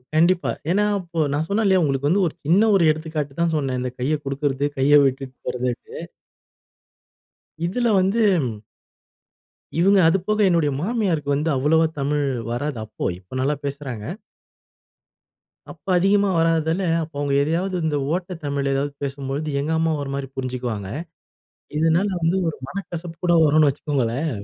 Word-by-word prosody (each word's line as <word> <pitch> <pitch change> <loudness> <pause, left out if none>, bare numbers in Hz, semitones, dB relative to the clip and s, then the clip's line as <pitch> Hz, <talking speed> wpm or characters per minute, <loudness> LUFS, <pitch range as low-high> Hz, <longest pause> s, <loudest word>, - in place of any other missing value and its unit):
கண்டிப்பா. 170 +3 +3 0.2
ஏன்னா 205 +3 +3 0.2
இப்போ 170 -2 -6
நான் 150 +2 0
சொன்னேன் 215 +2 0
இல்லயா, 190 -2 +4
உங்களுக்கு 140 -1 0
வந்து 195 +2 +3
ஒரு 155 - -5
சின்ன 195 +8 +4
ஒரு 190 - +4
எடுத்துக்காட்டு 155 -2 -4
தான் 165 -1 +2
சொன்னேன். 135 -3 -1
இந்த 125 -1 -3
கைய 145 +5 +1
குடுக்கறது, 140 0 -1
கைய 145 +2 +5
விட்டுட்டு 135 -1 -2
போறதுன்ட்டு. 125 -1 -3 1.6
இதில 240 +6 0
வந்து. 200 +5 +2 1.6
இவுங்க 195 +2 +5
அதுபோக 195 +5 0
என்னுடைய 165 -4 +2
மாமியாருக்கு 185 - -1
வந்து 155 +3 0
அவ்வளோவா 160 +4 +3
தமிழ் 145 +1 0 0.3
வராது 135 +3 -2
அப்போ, 110 - -6
இப்ப 95 +7 -12
நல்லா 145 +3 +1
பேசுறாங்க. 135 -6 -5 1.7
அப்போ - - -11
அதிகமா 200 +2 +3
வராததால, 165 +1 +2 0.2
அப்போ 155 -1 -11
அவங்க 145 -1 0
எதையாவது 175 +6 -1
இந்த 150 -2 0 0.2
ஓட்ட 180 +1 -3
தமிழ் 140 -1 -1
எதாவது 140 +1 -1
பேசும்பொழுது, 140 +2 -3
எங்க 150 +3 -2
அம்மா 160 0 +1
ஒரு 140 - -5
மாரி 140 -1 -4
புரிஞ்சுக்குவாங்க. 125 -6 -3 0.9
இதனால 165 +5 +3
வந்து 170 +3 +2
ஒரு 160 - -4
மனக்கசப்பு 175 -3 -6
கூட 170 -1 +4
வரும்னு 155 0 +5
வச்சுக்கோங்களேன். 140 0 -1
155 Hz, 140 wpm, -22 LUFS, 140-175 Hz, 1.7 s, கைய